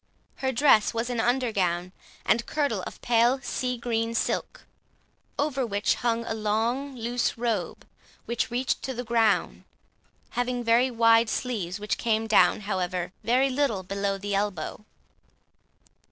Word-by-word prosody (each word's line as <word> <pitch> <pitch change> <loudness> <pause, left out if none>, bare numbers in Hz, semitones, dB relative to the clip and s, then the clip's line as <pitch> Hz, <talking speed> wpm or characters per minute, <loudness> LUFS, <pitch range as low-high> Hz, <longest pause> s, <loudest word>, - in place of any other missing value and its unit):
Her 265 -1 -1
dress 240 -4 +4
was 230 +2 -1
an 240 - -2
under 245 +1 +1
gown 180 -3 -1 0.3
and 230 +3 +2
kirtle 285 -10 0
of - - -10
pale 240 +2 +3
sea 250 -1 -2
green 230 -1 -2
silk, - - -2 0.7
over 285 -2 0
which 205 -3 +1
hung 235 -1 -1
a - - -2
long 225 +6 -1
loose 240 0 -1
robe, 225 -6 -2 0.4
which 235 +1 -1
reached 250 +2 -1
to 265 - -4
the 245 - -4
ground, 225 -3 +1 0.7
having 245 0 -1
very 235 +3 +4
wide 230 -1 +4
sleeves, 210 -8 -3
which 210 +1 -2
came 225 -1 +1
down, 210 -3 +4
however, 185 -3 -2
very 260 +3 +2
little 255 -8 0
below 195 +1 -2
the 200 +1 -4
elbow. 200 -2 -2
230 Hz, 140 wpm, -26 LUFS, 210-245 Hz, 0.7 s, dress